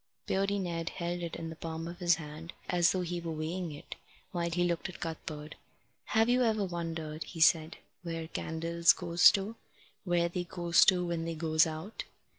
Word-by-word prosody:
Beardy 195 +1 +1
Ned 170 -3 -2
held 175 0 -3
it 170 -1 -4
in 165 0 -5
the - - -7
palm 160 0 -5
of 175 +1 -8
his 175 -1 +4
hand, 160 +2 -8
as 175 -2 +3
though 185 - 0
he 175 0 -3
were 165 -1 -4
weighing 160 +2 -3
it, 145 - -9 0.3
while 170 -1 -1
he 175 +1 +1
looked 175 +1 -1
at 180 - -10
Cuthbert. 155 -2 -6 0.5
"Have 225 +1 +3
you 250 +1 +3
ever 220 -4 +2
wondered," 165 -3 -4
he 165 - -9
said, 160 0 +4 0.2
"where 165 -2 -4
candles 165 +1 +2
goes 175 -1 +6
to 205 +3 -2 0.5
where 175 -2 +2
they 175 +1 -3
goes 175 -1 +4
to 180 -2 +4
when 170 -1 -2
they 165 0 -3
goes 160 0 +3
out?" 160 +7 -6
170 Hz, 190 wpm, -31 LUFS, 160-180 Hz, 0.5 s, goes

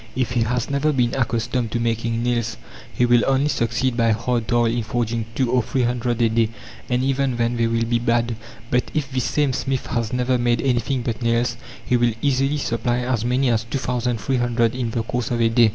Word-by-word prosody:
If 130 -1 -1
he 120 -1 +1
has 120 +1 0
never 140 +2 +1
been 125 -4 +1
accustomed 120 -1 -1
to 120 - 0
making 115 0 -1
nails 120 -2 -1 0.3
he 125 - +1
will 120 -1 +4
only 135 +2 +2
succeed 120 0 0
by 115 -2 +3
hard 115 0 -1
toil 120 -1 +3
in 115 +1 0
forging 115 0 -2
two 130 -2 +1
or 125 - +3
three 125 +2 -1
hundred 120 0 -1
a 115 - +4
day, 115 0 +2 0.4
and 125 0 +1
even 135 -2 0
then 120 0 0
they 115 -1 +1
will 115 0 0
be 120 0 +1
bad. 120 0 +1 0.4
But 125 0 +1
if 140 -3 -1
this 130 -1 -1
same 145 -3 +1
smith 135 0 -2
has 115 -3 -2
never 125 0 +1
made 120 -1 +1
anything 130 0 0
but 115 -1 -3
nails, 115 0 +1 0.3
he 125 - +2
will 120 -1 +2
easily 135 +2 +1
supply 120 -2 -1
as 120 -3 -1
many 125 +1 +2
as 115 -1 +1
two 115 +4 -3
thousand 125 -2 -1
three 130 +5 0
hundred 120 -1 +1
in 125 -2 -2
the 115 0 -2
course 120 +1 -3
of 120 - -1
a 115 -1 +3
day. 115 -1 +5
120 Hz, 225 wpm, -22 LUFS, 115-125 Hz, 0.4 s, day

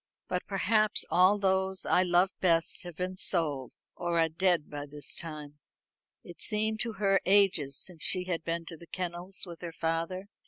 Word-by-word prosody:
But 180 0 -1
perhaps 215 +2 +2
all 185 +4 +5
those 190 -1 0
I 180 - +4
love 180 +1 +3
best 165 -2 +2
have 175 -2 -7
been 185 +2 -3
sold, 150 -9 0 0.2
or 170 -1 -1
are 165 0 +3
dead 170 -1 +1
by 145 0 -6
this 145 -2 -5
time." 150 -3 -6 0.6
It 175 - -12
seemed 215 0 0
to 230 0 -2
her 195 -2 +2
ages 185 -8 +3
since 175 -4 -6
she 185 - +2
had 175 -3 -3
been 165 0 -2
to 165 -1 -8
the 170 - -14
kennels 180 +1 -5
with 170 -2 -10
her 170 -1 -5
father. 165 +4 -2
175 Hz, 180 wpm, -30 LUFS, 165-190 Hz, 0.6 s, all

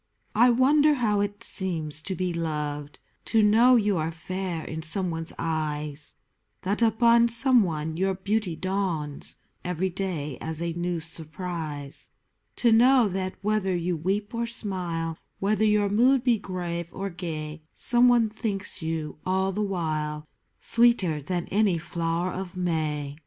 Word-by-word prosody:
I 240 +4 +5
wonder 290 +5 +4
how 215 -6 +1
it 205 0 -3
seems 160 -6 -1
to 190 +3 -4
be 180 0 -2
loved; 150 -3 -3 0.3
To 225 -2 +3
know 230 +5 +6
you 210 -4 +2
are 160 +1 -1
fair 175 0 -4
in 160 0 -5
someone's 165 -1 0
eyes; 150 -2 -3 0.5
That 200 +5 -1
upon 235 +1 +5
someone 195 - +3
your 190 +1 +1
beauty 195 -2 -1
dawns 180 -6 -2 0.3
Every 180 +1 -1
day 170 -7 -4
as 160 0 -3
a 170 0 -2
new 175 0 -2
surprise; 160 -3 -5 0.5
To 235 - +3
know 245 +1 +6
that, 185 0 -3
whether 205 -3 +1
you 175 +1 -1
weep 195 +7 -2
or 235 0 -1
smile, 175 -8 -3 0.2
Whether 215 +2 +1
your 210 -1 +3
mood 250 +5 +4
be 240 -4 +3
grave 175 -3 -4
or 195 0 -5
gay, 160 -3 -6
Somebody 240 -2 +4
thinks 210 -4 -3
you, 160 -2 -4
all 190 +1 0
the 205 +3 -2
while, 155 -6 -2 0.3
Sweeter 230 -10 +3
than 175 +4 -2
any 200 -3 +3
flower 170 +2 -2
of 185 0 -6
May. 155 -4 -2
185 Hz, 140 wpm, -26 LUFS, 160-210 Hz, 0.5 s, know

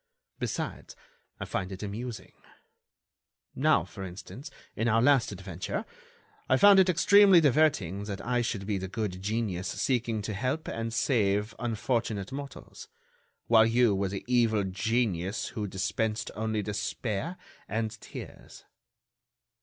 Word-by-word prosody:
Besides, - - -4 0.4
I - - -4
find 95 0 -3
it 95 +2 -7
amusing. 110 +3 -6 1.2
Now, - - +3
for 95 - -9
instance, 100 - -9 0.3
in 115 - 0
our 115 0 +3
last 130 -1 +4
adventure, 95 -2 -5 0.6
I 130 - +5
found 200 +4 +8
it 190 -1 +5
extremely 195 +2 +6
diverting 130 - +2
that 100 -2 -5
I 125 0 +1
should 105 -4 -3
be 100 -1 -1
the 95 - -4
good 95 -2 -4
genius 105 -3 -2
seeking 115 -4 -1
to 105 - -3
help 130 +10 -2
and 115 0 -3
save 110 -3 +1
unfortunate 115 -3 -2
mortals, 140 - -8 0.6
while 110 -1 +6
you 115 -1 +3
were 95 0 0
the 100 0 -6
evil 115 -4 +3
genius 95 -1 -1
who 105 -4 -4
dispensed 105 +3 -2
only 110 -1 -2
despair 105 - -3 0.3
and 110 +1 -2
tears." - - -10
110 Hz, 130 wpm, -29 LUFS, 100-125 Hz, 1.2 s, found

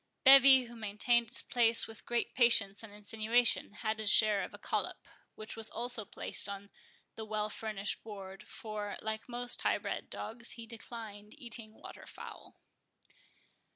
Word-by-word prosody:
Bevis, 270 -1 +8
who 240 - -11
maintained 225 +2 0
his - - -2
place 230 -1 +4
with 225 -1 -11
great 240 0 -1
patience 225 -5 +3
and 225 -2 -9
insinuation, 220 +4 +1
had 215 +1 -3
his 215 -1 +1
share 210 -2 +5
of - - -7
a - - -10
collop, - - -3 0.3
which 215 0 -7
was 225 -1 +1
also 240 -2 -1
placed 200 - 0
on 200 0 -8 0.4
the 220 - -7
well 215 -1 -2
furnished 210 -2 -4
board; 195 -2 -9
for, 210 -2 -6
like 220 +2 -4
most 245 0 -1
high - - +2
bred - - -5
dogs, 235 +2 -2
he 230 - -9
declined 220 -2 -9
eating 230 -3 -5
waterfowl. - - -11
220 Hz, 155 wpm, -32 LUFS, 210-235 Hz, 0.4 s, Bevis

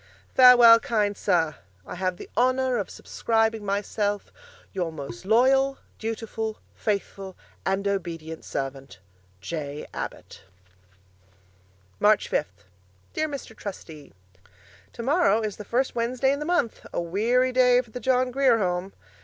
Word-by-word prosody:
Farewell, 245 -3 +9
kind 210 -3 0
Sir. 160 -6 +1 0.3
I - - -8
have 185 0 -2
the - - -9
honour 255 +2 +2
of 205 - -3
subscribing 225 -1 -1
myself, 205 +1 -2 0.4
Your 175 -4 -2
most 140 -5 -8
loyall, 265 +5 +3 0.2
dutifull, 225 0 -4 0.2
faithfull 195 -2 -3 0.3
and 195 +1 0
obedient 165 -5 -4
servant, 135 0 -5 0.4
J. 150 0 -5
Abbott - - -7 1.6
March 210 -1 +4
Fifth 100 -9 -3 0.5
Dear 310 0 -1
Mr. 275 -6 -7
Trustee, 160 -9 -9 0.8
Tomorrow 255 - +2
is 215 -2 -4
the 210 - -8
first 255 +5 0
Wednesday 250 +3 +1
in 280 - -3
the 300 - -4
month 345 -9 0
a - - -2
weary 225 +9 +1
day 250 -1 +5
for 240 -3 -20
the 250 - -6
John 255 0 +1
Grier 260 -2 +3
Home. 185 -1 -2
215 Hz, 130 wpm, -25 LUFS, 185-250 Hz, 1.6 s, Farewell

